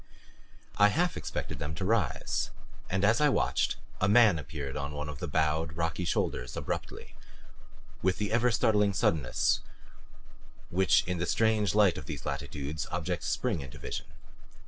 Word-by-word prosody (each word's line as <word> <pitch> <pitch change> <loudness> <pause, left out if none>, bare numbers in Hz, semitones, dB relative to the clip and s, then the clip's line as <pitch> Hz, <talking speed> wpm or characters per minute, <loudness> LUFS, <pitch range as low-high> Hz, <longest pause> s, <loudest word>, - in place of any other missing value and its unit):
I 100 - +8
half 175 +11 +1
expected - - -4
them 75 +2 -4
to 95 +3 -3
rise 110 +2 0 0.4
and 95 +2 +1
as 110 +7 +3
I 150 - +5
watched - - +1 0.2
a 95 - +2
man 105 -6 +6
appeared 70 -1 -6
on 70 0 -4
one 75 +1 -4
of 75 -2 -7
the 90 - -3
bowed, 80 +1 0
rocky 85 +1 -1
shoulders, - - -1
abruptly, - - -5 0.9
with 95 0 +1
the 105 -1 -2
ever 120 +2 +3
startling 105 -4 +3
suddenness 75 -9 +1 1.1
which 95 +2 +4
in 90 -1 -2
the 85 - -1
strange 110 -4 +2
light 105 -4 +4
of - - -11
these - - -6
latitudes 75 +2 -4
objects 85 0 -2
spring 110 - -1
into 65 -2 -9
vision. - - -5
90 Hz, 155 wpm, -30 LUFS, 75-105 Hz, 1.1 s, I